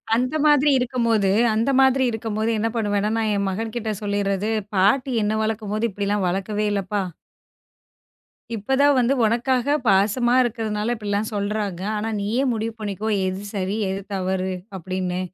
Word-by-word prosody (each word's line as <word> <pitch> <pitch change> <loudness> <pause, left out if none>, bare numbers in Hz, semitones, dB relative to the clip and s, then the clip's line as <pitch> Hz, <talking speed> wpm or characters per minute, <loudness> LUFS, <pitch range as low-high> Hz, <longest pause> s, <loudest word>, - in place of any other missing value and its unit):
அந்த 255 +5 0
மாதிரி 295 -1 +5
இருக்கும்போது, 235 -5 +1 0.3
அந்த 230 +5 +1
மாதிரி 265 0 +4
இருக்கும்போது 220 0 -2
என்ன 225 +1 0
பண்ணுவேன்னா, 210 -1 0
நான் 220 -1 0
என் 200 -1 0
மகன்கிட்ட 220 +2 -3
சொல்லிர்றது, 200 0 -1 0.3
"பாட்டி 250 +8 +3
என்ன 215 +1 0
வளக்கும்போது 215 +1 -1
இப்பிடிலாம் 200 0 -1
வளர்க்கவே 205 +3 -2
இல்லப்பா" 200 0 -1 1.5
"இப்பதான் 270 +6 +2
வந்து 245 +2 +3
உனக்காக 250 +5 +1
பாசமா 215 +5 +3
இருக்கிறதுனால 225 -1 -2
இப்பிடிலாம் 210 0 -2
சொல்றாங்க. 200 -3 -2 0.2
ஆனா 220 +2 -2
நீயே 225 +6 0
முடிவு 225 0 -3
பண்ணிக்கோ! 210 +1 -3 0.2
எது 185 +1 -3
சரி, 195 +1 -1
எது 190 +1 -3
தவறு 190 0 -1 0.2
அப்பிடின்னு. 185 0 -3
215 Hz, 135 wpm, -22 LUFS, 200-235 Hz, 1.5 s, மாதிரி